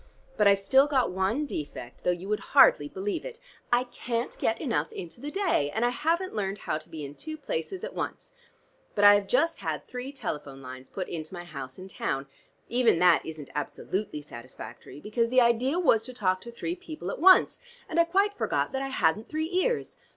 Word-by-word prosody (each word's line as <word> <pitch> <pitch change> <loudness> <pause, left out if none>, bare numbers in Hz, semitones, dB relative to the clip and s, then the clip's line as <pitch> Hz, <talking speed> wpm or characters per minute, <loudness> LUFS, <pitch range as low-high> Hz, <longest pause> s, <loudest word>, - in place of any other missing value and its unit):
But 210 - +4
I've 200 0 +6
still 265 +8 +4
got 265 -7 +2
one 190 +10 0
defect, 145 - -7
though - - +1
you 180 +2 -1
would 210 0 0 0.2
hardly 145 - +7
believe 195 +6 -3
it: - - -8 0.3
I 240 +1 +4
can't 245 -1 -3
get 225 0 +1
enough 225 - -1
into 175 +7 -8
the 290 - -4
day, 350 - +1
and 225 +2 +2
I - - +3
haven't 335 +8 0
learned 200 -2 -2
how 155 - -2
to 155 - -15
be 155 -2 -6
in 140 - -8
two 310 - -7
places 295 - -4
at - - -5
once. - - -5 0.6
But 205 - +1
I 205 - +11
have 205 -1 +2
just 310 +10 +2
had - - -3
three 250 +2 -6
telephone 145 - -5
lines 130 0 -10
put 185 - -4
into 160 +1 -6
my 175 - -6
house 135 -6 -8
in 185 - -9
town. 135 -7 -3 0.4
Even 240 -6 +3
that 175 -1 +5
isn't 155 -3 -8
absolutely 150 +2 -3
satisfactory, 120 0 -10
because 230 +6 0
the 255 +1 +5
idea 245 +6 +3
was 250 -11 +4
to 255 - -8
talk 185 -4 +1
to 235 - -9
three 330 +9 -4
people 345 -4 -6
at - - -6
once, 370 +3 +6 0.3
and - - -1
I 335 - +6
quite 395 +4 +2
forgot 410 - -1
that 265 0 -2
I 270 - -2
hadn't 215 -5 +1
three 315 +1 -2
ears. 450 +7 0
220 Hz, 210 wpm, -28 LUFS, -, 0.6 s, I